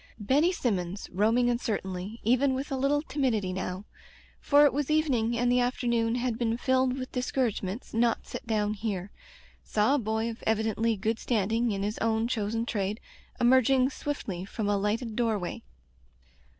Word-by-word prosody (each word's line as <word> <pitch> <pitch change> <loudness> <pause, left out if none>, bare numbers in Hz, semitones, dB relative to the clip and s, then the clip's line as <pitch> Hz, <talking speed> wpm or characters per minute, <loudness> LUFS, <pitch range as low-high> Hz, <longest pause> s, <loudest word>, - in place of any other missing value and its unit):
Benny 275 - +2
Sinunons, 195 - -2
roaming 225 +6 +2
uncertainly, 215 -4 -2
even 255 +4 +3
with 275 +3 -4
a - - 0
little 280 +3 +1
timidity 230 - -1
now 185 +1 -4 0.3
— - - -27
for 290 0 +5
it 285 - +3
was 290 0 -1
evening 255 -7 +1
and 245 +1 +2
the 250 - +4
afternoon 240 -2 +1
had 245 -1 -1
been 230 -1 0
filled 260 0 +1
with 255 -1 -5
discouragements 245 -4 -2
not 230 0 +1
set 260 - -8
down 210 -2 +1
here 200 -3 -4 0.3
— - - -28
saw 215 +5 +3
a 290 - +3
boy 220 0 -1
of 230 -1 -6
evidently 220 +1 +1
good 220 +3 -1
standing 225 +1 0
in 195 -1 -2
his 210 +2 -3
own 225 0 +1
chosen 225 -1 -1
trade, 210 -1 -2 0.4
emerging 260 +2 +4
swiftly 210 -12 -4
from 205 +2 -4
a 205 - +2
lighted 215 +3 -1
door 230 -2 +1
way. 180 -3 -5
230 Hz, 170 wpm, -28 LUFS, 210-255 Hz, 0.4 s, for